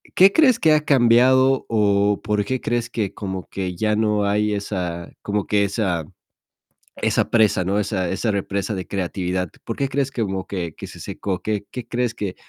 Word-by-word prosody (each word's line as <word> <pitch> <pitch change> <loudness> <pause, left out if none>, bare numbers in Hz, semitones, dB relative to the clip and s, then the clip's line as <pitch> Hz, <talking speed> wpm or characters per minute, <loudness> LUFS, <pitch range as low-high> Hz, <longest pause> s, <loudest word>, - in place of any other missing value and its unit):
¿Qué 190 +2 +7
crees 260 -7 +5
que 155 -1 +4
ha 150 - +3
cambiado, 130 +1 +4
o 100 -2 +2
por 105 -1 0
qué 130 +3 -2
crees, 120 0 -1
que 100 -5 -2
como 95 -2 -5
que 90 -2 -4
ya 105 +3 +1
no 105 -1 +1
hay 105 +1 +1
esa 90 -4 -4
como 105 -1 -2
que 105 -1 +2
esa 95 -6 -1 1.0
esa - - +1
presa, 110 -5 +3
¿no? 100 +3 0
Esa 95 -3 -1
esa 100 +4 -1
represa 100 +1 -2
de 95 -1 -5
creatividad. 90 -2 -2
¿Por - - -5
qué 140 - 0
crees, 135 -1 -1
que 120 - -3
como 95 -2 -3
que 85 -5 -4
que - - -8
se - - -12
secó? 95 -3 -4
¿Qué 105 -2 -2
qué 125 -2 -6
crees, 120 -1 -1
que 100 -3 -4
105 Hz, 190 wpm, -22 LUFS, 95-120 Hz, 1.0 s, Qué